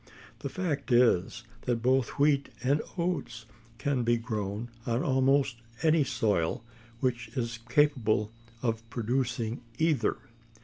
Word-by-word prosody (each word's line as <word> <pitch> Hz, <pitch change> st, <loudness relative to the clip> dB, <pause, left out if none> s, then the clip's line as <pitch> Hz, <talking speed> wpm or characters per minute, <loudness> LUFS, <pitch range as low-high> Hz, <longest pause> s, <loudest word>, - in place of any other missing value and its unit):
The -, -, -4 dB
fact 145 Hz, -9 st, -2 dB
is, 120 Hz, -3 st, +3 dB, 0.2 s
that 120 Hz, -2 st, 0 dB
both 130 Hz, 0 st, +2 dB
wheat 140 Hz, -1 st, +3 dB
and 140 Hz, +4 st, +3 dB, 0.2 s
oats 120 Hz, -10 st, -2 dB, 0.3 s
can 135 Hz, +3 st, 0 dB
be 120 Hz, 0 st, +3 dB
grown 110 Hz, -1 st, -3 dB, 0.2 s
on 120 Hz, +2 st, +1 dB
almost 135 Hz, -1 st, +3 dB, 0.3 s
any 160 Hz, -1 st, +5 dB
soil 110 Hz, -9 st, 0 dB, 0.4 s
which 120 Hz, -3 st, 0 dB
is 115 Hz, -1 st, -2 dB
capable 115 Hz, -6 st, +2 dB, 0.3 s
of 115 Hz, -2 st, 0 dB
producing 120 Hz, 0 st, -1 dB, 0.2 s
either. 160 Hz, -3 st, +2 dB
125 Hz, 120 wpm, -29 LUFS, 115-140 Hz, 0.4 s, any